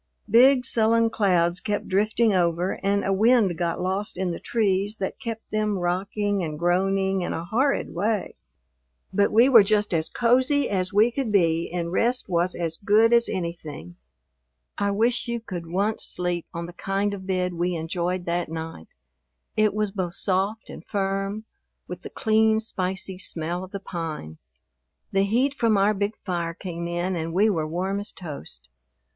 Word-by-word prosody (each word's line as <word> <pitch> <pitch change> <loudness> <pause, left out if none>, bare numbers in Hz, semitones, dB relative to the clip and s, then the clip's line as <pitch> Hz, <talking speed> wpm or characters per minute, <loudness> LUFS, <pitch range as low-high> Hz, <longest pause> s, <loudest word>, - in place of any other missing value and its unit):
Big 255 +3 +6
sullen 230 0 +3
clouds 180 -5 +2
kept 210 -1 -2
drifting 215 +3 +2
over 175 0 0
and 200 +1 +1
a 195 - +1
wind 215 -2 +4
got 170 0 -2
lost 190 +3 -2
in 185 -1 -1
the 170 - -5
trees 205 -1 0
that 190 - -4
kept 225 -1 -5
them 215 -1 0
rocking 195 +3 -1
and 155 -3 -4
groaning 190 +3 +1
in 175 - -2
a 165 - -4
horrid 265 +9 0
way. 205 +3 -1 0.8
But 200 +1 +3
we 230 +4 +6
were 240 -5 +8
just 205 -1 +1
as 160 -1 0
cozy 255 +4 +2
as 185 -2 -1
we 215 +4 +4
could 250 -3 -2
be 170 -4 +2
and 170 -1 -3
rest 240 +6 0
was 175 0 +1
as 165 -2 -2
good 220 +3 +4
as 235 0 +4
anything. 160 - -5 0.8
I 200 - 0
wish 230 +5 +1
you 235 0 -2
could 180 -7 -7
once 200 +6 -1
sleep 175 -1 -1
on 170 0 -5
the 175 - -9
kind 195 +3 -1
of 190 -1 -7
bed 180 -1 0
we 175 +1 -1
enjoyed 175 +2 -2
that 170 0 -1
night. 160 - -6 0.7
It 215 -1 +3
was 210 0 -1
both 185 -3 -3
soft 195 +3 -1
and - - -10
firm, 195 +1 -2 0.4
with - - -7
the - - -8
clean, 220 0 +2
spicy 190 -3 -3
smell 175 0 -2
of 185 - -9
the 200 - -6
pine. 160 - -6 0.7
The 195 0 +2
heat 250 +7 +1
from 230 -6 +2
our 200 +2 +3
big 205 +1 -2
fire 170 -3 -2
came 170 -2 -5
in 175 +2 -2
and 165 -1 -3
we 210 +4 +4
were 160 -5 -1
warm 185 +5 -2
as 205 - -5
toast. 140 - -7
195 Hz, 175 wpm, -25 LUFS, 175-215 Hz, 0.8 s, were